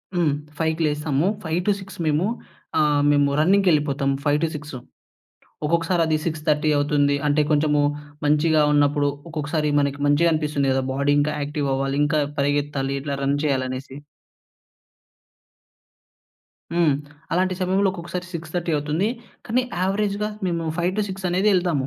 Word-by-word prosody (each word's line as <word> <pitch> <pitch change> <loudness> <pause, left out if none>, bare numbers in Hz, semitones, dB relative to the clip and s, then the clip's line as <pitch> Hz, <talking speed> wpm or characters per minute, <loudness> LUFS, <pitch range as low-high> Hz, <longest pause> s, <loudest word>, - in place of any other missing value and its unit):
హ్మ్. 170 -4 +2 0.3
5కి 160 0 0
లేస్తాము. 150 +1 0 0.2
5-6 190 +4 -2
మేము 155 +4 +2 0.5
ఆహ్, 150 -1 +3
మేము 145 -1 +3
రన్నింగ్‌కెళ్ళిపోతాము 150 -6 +2
5-6 150 -1 -1 0.9
ఒక్కొక్కసారి 170 +2 +1
అది 155 - +2
6:30 155 -1 0
అవుతుంది. 145 0 +2
అంటే, 150 +1 +3
కొంచెము 150 -1 +3 0.4
మంచిగా 150 +1 +3
ఉన్నపుడు, 145 0 +3 0.2
ఒక్కొక్కసారి 155 -1 -2
మనకి, 140 0 0
మంచిగా 160 +4 +4
అనిపిస్తుంది 150 -3 0
గదా! 130 0 +1
బాడీ. 140 +2 +1
ఇంకా 150 +1 0
యాక్టివ్ 145 -1 -2
అవ్వాలి, 135 +1 -1
ఇంకా 150 +1 +1 0.2
పరిగెత్తాలి, 145 -1 0
ఇట్లా 140 0 -3
రన్ 140 +1 +1
చేయాలి, 135 -3 +1
అనేసి. 130 +1 -6 2.8
హ్మ్. 170 -4 +3 0.4
అలాంటి 185 +1 +1
సమయంలో 190 +2 +2
ఒక్కొక్కసారి 180 -1 -6
6:30 170 +1 -4
అవుతుంది 150 +7 0 0.4
కానీ, 250 +3 +1 0.2
అవరేజ్‌గా 205 +2 0 0.2
మేము 170 -2 -1
5-6 190 +2 -2
అనేది 185 +4 +2
ఎళ్తాము. 170 -7 +1
150 Hz, 120 wpm, -23 LUFS, 145-175 Hz, 2.8 s, మంచిగా